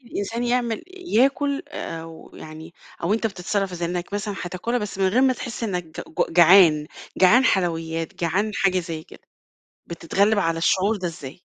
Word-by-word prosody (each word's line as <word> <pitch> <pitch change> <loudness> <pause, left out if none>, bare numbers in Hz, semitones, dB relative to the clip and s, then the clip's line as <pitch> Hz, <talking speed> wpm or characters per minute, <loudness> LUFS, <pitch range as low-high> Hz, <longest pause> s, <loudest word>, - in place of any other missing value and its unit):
الإنسان 230 +2 -3
يعمل 240 -2 0 0.3
ياكل، 275 +4 +2
أو 165 - -8
يعني 155 +1 -10 0.3
أو 170 +5 +1
أنت 225 0 0
بتتصرّف 195 -1 -2
إزاي، 170 -1 -3
إنك 175 +2 -4
مثلًا 205 0 -3
هتاكلها 185 +7 -2
بس 210 -3 -6
من 190 - +3
غير 225 +7 +2
ما 265 - +4
تحس 240 -2 -7
إنك 180 -5 -2 0.2
ج - - -3
جعان، 170 -3 +6 0.3
جعان 220 +8 +5
حلويات، 165 -5 -1
جعان 185 +6 0
حاجة 190 -2 +2
زي 165 -2 -6
كده، - - -16 0.7
بتتغلّب 195 +5 +1
على 165 -3 0
الشعور 190 +6 +2
ده 185 - -3
إزاي؟ 160 -1 -9
185 Hz, 160 wpm, -23 LUFS, 165-220 Hz, 0.7 s, جعان